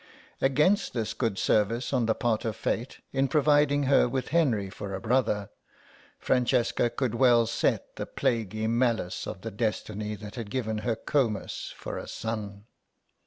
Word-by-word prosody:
Against 150 Hz, +10 st, +3 dB
this 110 Hz, -2 st, -2 dB
good 115 Hz, -6 st, -1 dB
service 115 Hz, +7 st, +1 dB
on 125 Hz, -4 st, +2 dB
the 110 Hz, -, +2 dB
part 115 Hz, -3 st, 0 dB
of 110 Hz, -3 st, -2 dB
Fate 120 Hz, +4 st, -3 dB
in 135 Hz, 0 st, +2 dB
providing 145 Hz, 0 st, +3 dB
her 135 Hz, -2 st, +4 dB
with 130 Hz, 0 st, -2 dB
Henry 130 Hz, -12 st, +2 dB
for 95 Hz, 0 st, -6 dB
a -, -, -4 dB
brother, 110 Hz, -3 st, 0 dB, 0.7 s
Francesca 120 Hz, -1 st, +2 dB
could 120 Hz, 0 st, -2 dB
well 120 Hz, -1 st, +5 dB
set 115 Hz, -, -1 dB
the -, -, -4 dB
plaguy 110 Hz, -2 st, -1 dB
malice 115 Hz, -5 st, 0 dB
of 95 Hz, -, -6 dB
the 115 Hz, -, -5 dB
destiny 105 Hz, -1 st, -2 dB
that 105 Hz, 0 st, -9 dB
had 115 Hz, -4 st, -6 dB
given 110 Hz, -3 st, -2 dB
her 115 Hz, +1 st, -1 dB
Comus 115 Hz, -3 st, -1 dB
for -, -, -5 dB
a -, -, -8 dB
son. 105 Hz, -3 st, -5 dB
115 Hz, 160 wpm, -28 LUFS, 105-130 Hz, 0.7 s, well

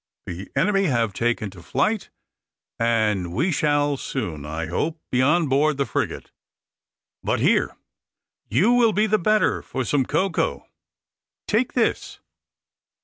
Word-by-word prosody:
The 90 Hz, +3 st, -7 dB
enemy 195 Hz, -1 st, +2 dB
have 115 Hz, -, +1 dB
taken 115 Hz, -1 st, -1 dB
to 90 Hz, -2 st, -13 dB
flight, 145 Hz, -, -1 dB, 0.7 s
and 110 Hz, -6 st, +1 dB
we 165 Hz, +9 st, +1 dB
shall 145 Hz, -2 st, +1 dB
soon, 80 Hz, -, -4 dB
I 80 Hz, +2 st, -3 dB
hope, 155 Hz, -, -2 dB
be 125 Hz, -, +2 dB
on 150 Hz, +4 st, +3 dB
board 145 Hz, +2 st, +2 dB
the 140 Hz, -, +1 dB
frigate. -, -, -3 dB, 0.9 s
But -, -, 0 dB
here, -, -, +2 dB, 0.7 s
you 215 Hz, +6 st, +3 dB
will 240 Hz, -3 st, +4 dB
be 210 Hz, +2 st, +2 dB
the 215 Hz, 0 st, +2 dB
better 215 Hz, +4 st, +2 dB
for 130 Hz, -, -4 dB
some 135 Hz, -1 st, +1 dB
cocoa. 170 Hz, +3 st, 0 dB, 0.8 s
Take 230 Hz, +4 st, +1 dB
this." 400 Hz, -, -1 dB
145 Hz, 135 wpm, -23 LUFS, -, 0.9 s, will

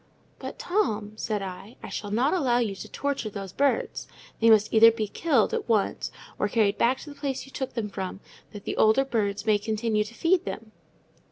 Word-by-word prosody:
"But, -, -, -7 dB
Tom," 215 Hz, -, -1 dB
said 215 Hz, -2 st, -2 dB
I, 195 Hz, +4 st, -8 dB
"I -, -, -6 dB
shall 205 Hz, -, -5 dB
not 245 Hz, +8 st, +2 dB
allow 265 Hz, -10 st, +2 dB
you 230 Hz, -5 st, 0 dB
to 195 Hz, -, -9 dB
torture 280 Hz, -6 st, -2 dB
those 195 Hz, -2 st, -7 dB
birds. 285 Hz, -, 0 dB, 0.3 s
They 230 Hz, -, +5 dB
must 215 Hz, -1 st, +5 dB
either 225 Hz, +1 st, +9 dB
be 220 Hz, -2 st, -2 dB
killed 265 Hz, -1 st, +1 dB
at -, -, -2 dB
once 215 Hz, -3 st, +1 dB, 0.3 s
or -, -, +2 dB
carried 205 Hz, -2 st, +2 dB
back 255 Hz, +3 st, +3 dB
to 295 Hz, -, -9 dB
the -, -, -11 dB
place 275 Hz, -3 st, -3 dB
you 270 Hz, -, -15 dB
took 265 Hz, -1 st, -5 dB
them 225 Hz, -3 st, -1 dB
from, 190 Hz, -1 st, -5 dB, 0.3 s
that 205 Hz, -1 st, -9 dB
the -, -, -4 dB
old 220 Hz, +2 st, +5 dB
birds 205 Hz, -3 st, 0 dB
may 215 Hz, -2 st, +3 dB
continue 215 Hz, 0 st, 0 dB
to 230 Hz, +2 st, -12 dB
feed 340 Hz, +5 st, +2 dB
them." 215 Hz, +3 st, -6 dB
220 Hz, 205 wpm, -26 LUFS, 205-255 Hz, 0.3 s, either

